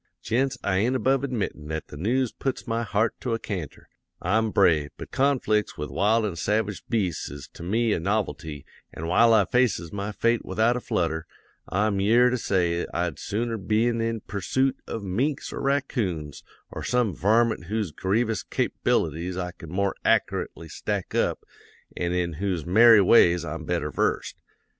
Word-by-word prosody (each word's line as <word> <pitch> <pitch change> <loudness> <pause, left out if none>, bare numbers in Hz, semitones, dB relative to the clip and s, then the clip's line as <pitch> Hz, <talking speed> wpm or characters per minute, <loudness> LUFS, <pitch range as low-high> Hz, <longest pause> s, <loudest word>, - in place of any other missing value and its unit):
"'Gents, 130 +4 0
I 95 -2 +1
ain't 120 +7 +1
above 130 +2 +2
admittin' 110 - -3
that 80 0 -5
the - - -10
news 120 - 0
puts 130 -2 -3
my 115 -1 -1
heart 110 0 0
to 120 -3 -1
a - - -1
canter. 90 -9 -6 0.3
I'm 110 +5 +1
brave; 80 -8 +3
but - - -9
conflicts 130 -6 +1
with 75 - -5
wild 110 +2 +2
an' 95 -5 -3
savage 105 +2 -1
beasts 95 -9 -1
is 70 0 -9
to - - -13
me 110 +5 +1
a - - 0
novelty 85 -6 -2 0.3
an' 80 - -7
while 110 +8 +4
I 110 -3 +5
faces 115 -9 +1
my 100 +1 -3
fate 115 +2 +1
without 115 +3 +1
a - - -1
flutter, 80 -8 -2 0.4
I'm 100 0 +1
yere 120 +5 +5
to 125 - 0
say 85 -5 0
I'd 85 -3 -2
sooner 115 +2 -2
been 115 +4 +1
in 115 -1 -2
pursoot 130 +7 0
of 115 - -5
minks 125 +10 -2
or - - -5
raccoons 110 - -1 0.3
or - - -6
some 125 -5 +1
varmint 110 +3 +2
whose 105 -2 -2
grievous 110 +5 0
cap'bilities 85 +4 -1
I 90 -1 -3
can 85 -2 -12
more 100 +3 0
ackerately 80 - 0
stack - - -3
up - - 0 0.5
an' 85 -1 -1
in 90 -2 -1
whose 90 -6 -1
merry 110 +4 +7
ways 90 -4 +5
I'm 85 -1 -5
better 80 -3 -1
versed. - - -1
105 Hz, 170 wpm, -25 LUFS, 85-115 Hz, 0.5 s, merry